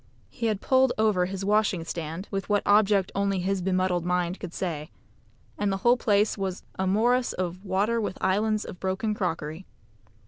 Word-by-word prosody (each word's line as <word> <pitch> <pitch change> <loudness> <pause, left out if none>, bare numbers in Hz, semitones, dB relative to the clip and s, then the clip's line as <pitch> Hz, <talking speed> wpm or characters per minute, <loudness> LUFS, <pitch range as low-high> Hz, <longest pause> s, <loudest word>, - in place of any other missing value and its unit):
He 230 - -2
had 210 -3 -1
pulled 260 -1 +3
over 210 -5 +2
his 195 +1 -4
washing 205 -5 +2
stand 165 +3 -5
(with 195 0 -3
what 205 -1 +2
object 205 -2 +4
only 200 0 0
his 190 +1 -1
bemuddled 185 -1 +1
mind 180 +1 -1
could 180 - -6
say), 160 -5 -4 0.7
and 205 -1 +1
the 195 - 0
whole 240 +1 +7
place 210 -3 +1
was 190 -1 -3 0.2
a 190 - +1
morass 240 +6 +2
of 185 +1 -4
water 205 +4 +1
with 200 -3 -3
islands 210 +3 +1
of 180 - -9
broken 190 +3 -1
crockery. 165 -3 -3
195 Hz, 175 wpm, -26 LUFS, 180-210 Hz, 0.7 s, whole